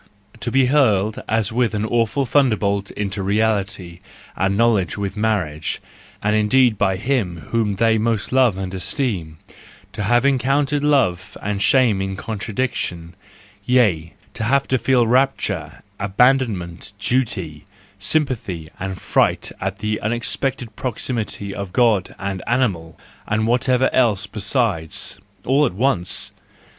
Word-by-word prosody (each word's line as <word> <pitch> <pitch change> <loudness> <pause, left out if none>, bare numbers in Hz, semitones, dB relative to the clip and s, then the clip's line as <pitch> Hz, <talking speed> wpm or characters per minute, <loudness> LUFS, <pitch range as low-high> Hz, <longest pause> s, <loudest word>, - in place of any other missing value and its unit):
To - - -2
be 135 +2 +3
hurled 110 -7 +2
as 110 -1 +1
with 120 -2 +1
an 105 +1 -1
awful 120 +4 +1
thunderbolt 105 -7 +1
into 100 -1 -4
reality 100 -3 -1 0.4
and 95 +2 0
knowledge 110 -6 +2
with 100 0 -3
marriage—and 105 0 -3
indeed 115 +2 +4
by 95 -2 +1
him 105 -6 -1
whom 110 -3 +1
they 110 +1 +2
most 110 -1 -1
love 125 -6 +3
and 95 -1 -5
esteem: 95 - -2 0.5
to - - -5
have 120 +5 +2
to 140 - +5
encounter 140 +2 +1
love 95 -11 +1
and 105 -1 -3
shame 120 -7 +3
in 95 0 -3
contradiction, 100 -5 -3 0.5
yea, 100 -11 +2 0.2
to - - -4
Have 140 +3 +2
to 130 - +2
feel 125 -2 +3
rapture, 110 - 0 0.2
abandonment, 105 -5 +1
duty, 100 - -1 0.3
sympathy, 100 - -1
and 95 0 -4
fright - - +1
at 100 +1 -2
the 110 +1 -2
unexpected 120 +1 -2
proximity 115 -5 -3
of 100 -2 -6
God 110 -6 +2
and 95 -1 -4
animal, 95 -11 0 0.3
and 110 +1 0
whatever 125 +2 +2
else 110 -7 +2
besides! 100 - -1 0.3
all 135 +4 +3
at - - -5
once! 100 -4 +1
110 Hz, 130 wpm, -20 LUFS, 95-125 Hz, 0.5 s, to